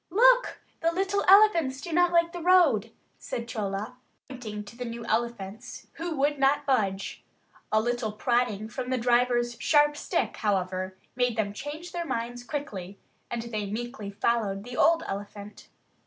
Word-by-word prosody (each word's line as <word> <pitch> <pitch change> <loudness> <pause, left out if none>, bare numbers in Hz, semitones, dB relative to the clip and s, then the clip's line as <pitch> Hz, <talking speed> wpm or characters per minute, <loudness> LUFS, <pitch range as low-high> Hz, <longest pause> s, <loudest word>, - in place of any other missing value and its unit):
"Look, - - +4 0.2
the 330 0 +2
little 390 +3 0
elephants 360 -9 +6
do 335 +3 -6
not 355 +1 +4
like 340 0 +3
the 350 - -5
road," 320 - +4 0.3
said 235 0 -5
Chola, 210 +2 -4 0.3
pointing 220 -5 -7
to 205 +3 -13
the 250 - -5
new 235 -1 -6
elephants, 230 0 -3
who 335 -1 -3
would 285 +1 +1
not 280 +2 +3
budge. 200 -8 -1 0.5
A 215 - +4
little 240 -1 -1
prodding 215 -1 0
from 250 +2 -5
the 260 - +1
driver's 240 0 +2
sharp 295 +1 +4
stick, - - -2
however, 185 -2 -1 0.2
made 245 -2 +1
them 205 -2 0
change 300 +9 -7
their 345 -1 -3
minds 245 -3 -3
quickly; 205 -10 -5 0.3
and 235 -1 -3
they 215 -3 -4
meekly 225 -1 -5
followed 200 -1 0
the 245 +2 -8
old 330 +4 +4
elephant. 205 +1 -7
240 Hz, 155 wpm, -27 LUFS, 215-295 Hz, 0.5 s, elephants